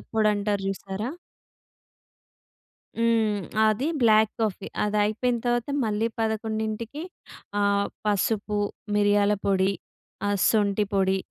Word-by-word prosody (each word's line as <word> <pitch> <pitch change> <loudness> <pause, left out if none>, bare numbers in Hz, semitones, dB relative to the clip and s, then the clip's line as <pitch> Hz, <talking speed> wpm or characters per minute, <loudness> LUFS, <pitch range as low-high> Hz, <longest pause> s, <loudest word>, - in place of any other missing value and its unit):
పొడి 215 -1 +4
అంటారు 205 -1 -1
చూసారా! 195 +4 -4 1.9
హ్మ్. 225 -3 +2 0.3
అది 215 +8 +1
బ్లాక్ 220 -1 +5
కాఫీ 205 -2 -1 0.2
అదయిపోయిన 215 +4 +1
తర్వాత 240 +2 0 0.2
మళ్ళీ 215 +1 0
11కి 220 +5 -2 0.6
ఆహ్, 200 0 +2 0.2
పసుపు 210 +1 0 0.4
మిరియాల 205 0 +3
పొడి, 195 0 +3 0.6
ఆహ్, 205 0 +1
సొంటి 205 -1 +2
పొడి, 190 0 +2
210 Hz, 95 wpm, -26 LUFS, 200-220 Hz, 1.9 s, బ్లాక్